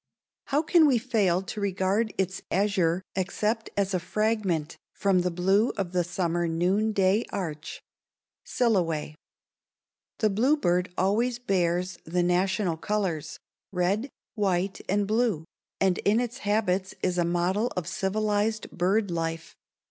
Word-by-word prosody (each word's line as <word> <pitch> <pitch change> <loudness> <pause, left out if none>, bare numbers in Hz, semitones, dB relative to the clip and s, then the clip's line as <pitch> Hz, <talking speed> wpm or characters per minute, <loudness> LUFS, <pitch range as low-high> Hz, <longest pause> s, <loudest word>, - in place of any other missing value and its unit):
_ - - -19
How 290 +3 +2
can 320 0 +5
we 265 -4 +4
fail 210 -7 +1
to 210 +2 -6
regard 200 +3 0
its 190 0 -1
azure 185 -3 +1
except 210 +4 -1
as 195 -1 +1
a 185 - +1
fragment 190 -4 -1 0.2
from 195 -2 +2
the 180 0 +1
blue 190 +6 +2
of 190 -3 -2
the 180 -1 +1
summer 175 -1 -1
noonday 195 +4 +2
arch? 160 -6 -5 0.6
Silloway. 170 -11 0 1.0
The 215 -2 +2
bluebird 200 -6 +2
always 225 +6 +1
bears 180 -5 0
the 175 +2 0
national 180 0 +1
colors 170 -6 -2 0.3
red, 195 +8 0 0.2
white, 195 -3 0
and 200 +1 +2
blue 215 -6 +1 0.3
and 190 -2 +2
in 210 +3 +2
its 245 0 -3
habits 200 -3 0
is 180 -1 +1
a - - +3
model 175 +6 +1
of 180 - -1
civilized 210 +3 -1
bird 195 +3 +1
life. 165 -1 -3
190 Hz, 135 wpm, -27 LUFS, 175-215 Hz, 1.0 s, can